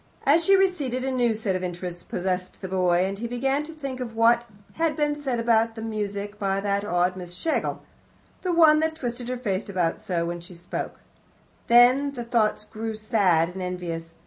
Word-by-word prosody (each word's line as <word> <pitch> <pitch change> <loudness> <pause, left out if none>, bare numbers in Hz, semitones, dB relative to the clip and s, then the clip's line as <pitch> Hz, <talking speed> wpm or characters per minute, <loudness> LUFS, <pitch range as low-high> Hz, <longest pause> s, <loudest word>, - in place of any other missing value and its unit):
As 310 +5 +5
she 390 +4 +6
receded, 300 -10 +1
a 265 - 0
new 240 -3 +2
set 210 -3 -1
of 185 - -3
interests 175 -1 -5
possessed 185 0 -3
the - - -2
boy, 180 -1 +2
and 195 +1 -4
he 235 - -3
began 270 +4 0
to 320 - -8
think 275 -5 -6
of 235 -3 -5
what 235 +1 +4 0.3
had 325 -2 0
been 295 -1 +1
said 270 -5 -2
about 230 0 +2
music 210 -2 -4
by 195 -1 0
that 200 0 0
odd 180 -1 +1
Miss 180 -1 -8
Schlegel 320 - -2 0.6
the 365 - -1
one 320 -3 +6
that 320 0 0
twisted 245 -4 -4
her 255 - -2
face 205 -4 -2
about 180 -3 0
so 180 -6 -2
when 175 0 -4
she 175 +1 -12
spoke. 175 +1 -6 0.7
Then 250 +4 +5
the 245 -3 -5
thoughts 230 -3 +1
grew 220 +1 -5
sad 195 -6 +2
and 185 +1 -7
envious. 170 -2 -5
220 Hz, 195 wpm, -25 LUFS, 185-255 Hz, 0.7 s, she